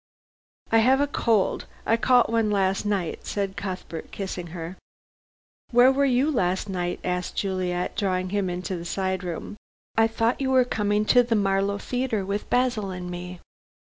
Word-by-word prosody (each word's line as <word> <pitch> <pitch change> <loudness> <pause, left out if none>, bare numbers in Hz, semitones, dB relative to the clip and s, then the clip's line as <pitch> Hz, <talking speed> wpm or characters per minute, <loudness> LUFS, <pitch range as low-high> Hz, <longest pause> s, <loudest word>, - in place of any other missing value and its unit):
"I 225 - +6
have 260 +4 +4
a 285 - +3
cold. 230 -7 +1 0.2
I 225 - +3
caught 245 0 +3
one 225 -2 +2
last 195 0 +1
night," 195 -5 -2
said 195 -2 -2
Cuthbert, 185 -4 -6
kissing 185 -3 -5
her. 170 +1 -7 0.9
"Where 245 +1 +6
were 280 +1 +2
you 265 +3 +2
last 190 -6 0
night?" 180 -2 -2
asked 180 0 -2
Juliet, 185 -2 -1
drawing 185 -2 -1
him 200 -2 0
into 180 0 -3
a - - -7
side 190 +1 -2
room. 180 +4 -5 0.4
"I 225 0 +5
thought 225 +3 0
you 265 - 0
were 260 -1 +4
coming 210 -2 0
to 245 +3 +6
the 240 -1 0
Marlow 200 0 +1
Theatre 240 -2 -2
with 200 +2 -3
Basil 245 -5 +1
and 180 -1 -5
me." 180 0 -7
200 Hz, 170 wpm, -25 LUFS, 185-230 Hz, 0.9 s, I